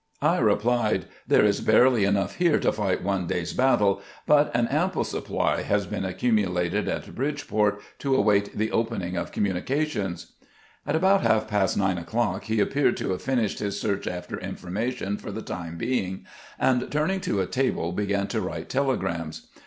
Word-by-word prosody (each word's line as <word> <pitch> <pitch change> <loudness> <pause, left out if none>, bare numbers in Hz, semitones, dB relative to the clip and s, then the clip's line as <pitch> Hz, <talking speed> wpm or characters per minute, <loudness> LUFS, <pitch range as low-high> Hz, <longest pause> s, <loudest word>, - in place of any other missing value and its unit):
I - - +3
replied, 110 -4 +2
" - - -29
There - - +5
is 100 -1 +2
barely 115 -1 +5
enough 100 0 0
here 175 -3 +3
to - - +3
fight 100 -3 -1
one 95 -2 -1
day's 85 0 -2
battle, 105 -7 +3 0.2
but 150 0 +4
an 120 0 +2
ample 175 +7 +1
supply - - -1
has 100 -1 0
been 95 - -3
accumulated 90 -4 0
at - - -4
Bridgeport 110 -7 0 0.2
to 135 -1 +1
await 100 -3 +2
the 110 +1 0
opening 110 -6 -1
of 85 - -3
communications." 100 - -2 0.6
At 145 - +1
about 190 +4 +4
half 110 -1 +2
past 105 -3 +1
nine 95 -3 +1
o'clock 105 +2 -1
he 110 -1 0
appeared 140 +7 +2
to - - -2
have 90 - -3
finished 120 -6 0
his 100 -1 -2
search 100 -2 -2
after 90 0 -5
information 105 +2 -3
for 105 - -7
the 110 +2 -5
time 85 -2 -6
being, 95 -3 -2 0.3
and 125 -1 +1
turning 160 +6 0
to 100 - -1
a 95 - +1
table, 125 -8 -1
began 100 +1 0
to - - -1
write - - -5
telegrams. 85 - -2
105 Hz, 170 wpm, -26 LUFS, 95-130 Hz, 0.6 s, There